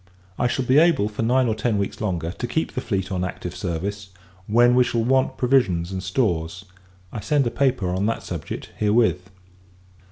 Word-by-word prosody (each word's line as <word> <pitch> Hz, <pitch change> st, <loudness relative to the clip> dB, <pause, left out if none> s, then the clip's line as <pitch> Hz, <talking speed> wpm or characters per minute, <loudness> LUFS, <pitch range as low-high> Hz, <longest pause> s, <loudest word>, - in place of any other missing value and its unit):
I 120 Hz, -, +2 dB
shall 130 Hz, +1 st, -1 dB
be 130 Hz, +4 st, +5 dB
able, 160 Hz, -10 st, +3 dB
for 105 Hz, +1 st, -5 dB
nine 125 Hz, +3 st, +3 dB
or 110 Hz, -, +1 dB
ten 110 Hz, 0 st, -1 dB
weeks 100 Hz, -1 st, -3 dB
longer, 85 Hz, -6 st, -2 dB
to 120 Hz, +6 st, -5 dB
keep 160 Hz, +7 st, -1 dB
the 125 Hz, -, -3 dB
fleet 95 Hz, -6 st, -2 dB
on 90 Hz, -1 st, -1 dB
active 90 Hz, -1 st, -5 dB
service, 100 Hz, +3 st, -4 dB, 0.4 s
when 120 Hz, +3 st, +5 dB
we 125 Hz, 0 st, +5 dB
shall 120 Hz, -2 st, -1 dB
want 130 Hz, +2 st, +1 dB
provisions 100 Hz, -10 st, +2 dB
and 95 Hz, -1 st, -3 dB
stores. 95 Hz, -3 st, -1 dB, 0.5 s
I -, -, -5 dB
send 145 Hz, +4 st, +1 dB
a 120 Hz, -, -1 dB
paper 130 Hz, -9 st, +1 dB
on 95 Hz, +3 st, 0 dB
that 115 Hz, -, -2 dB
subject, -, -, -6 dB
herewith. 105 Hz, -4 st, +2 dB
110 Hz, 190 wpm, -23 LUFS, 95-125 Hz, 0.5 s, be